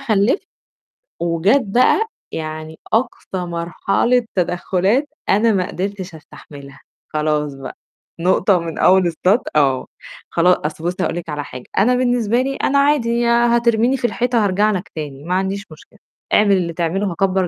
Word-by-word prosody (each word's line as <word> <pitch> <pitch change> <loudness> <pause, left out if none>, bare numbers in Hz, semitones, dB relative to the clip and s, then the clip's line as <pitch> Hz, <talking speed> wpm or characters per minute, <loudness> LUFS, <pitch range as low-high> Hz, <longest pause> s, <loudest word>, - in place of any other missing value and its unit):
خلِّفت 220 - +1 0.7
وجات 170 +10 +2
بقى 255 - +3 0.2
يعني 155 0 -6
أقصى 225 -4 -1
مرحلة 195 +8 0
تدخّلات 190 - 0 0.2
أنا 220 +3 +4
ما 185 -3 0
قدرتش 190 -2 -5
أستحملها، 140 -2 -13 0.3
خلاص 150 -1 0
بقى، 135 -1 -9 0.4
نقطة 185 +2 +3
ومن 165 -1 -5
أول 185 -1 +4
السط 185 +7 +1
آه، 135 -3 +2 0.4
خلا 175 -2 +2
أصل 160 +1 -9
بُصّي 180 +2 -2
هاقول - - -1
لِك 170 -1 -6
على 145 -1 -3
حاجة، 125 -2 -10
أنا 245 +6 +4
بالنسبة 245 -2 +1
لي، 275 +1 -2
أنا 280 +1 +1
عادي 240 -5 +2
هترميني 235 +1 +3
في 245 - -3
الحيطة 240 -2 0
هارجع 205 +3 +2
لك 185 -3 -4
تاني، 145 -2 -6
ما 180 +2 -3
عنديش 195 +2 -2
مشكلة، 180 +7 -16 0.3
اعمل 205 -2 +5
اللي 170 -2 -2
تعمله 180 +4 -1
هاكبّر 190 +1 +1
190 Hz, 150 wpm, -19 LUFS, 165-235 Hz, 0.7 s, اعمل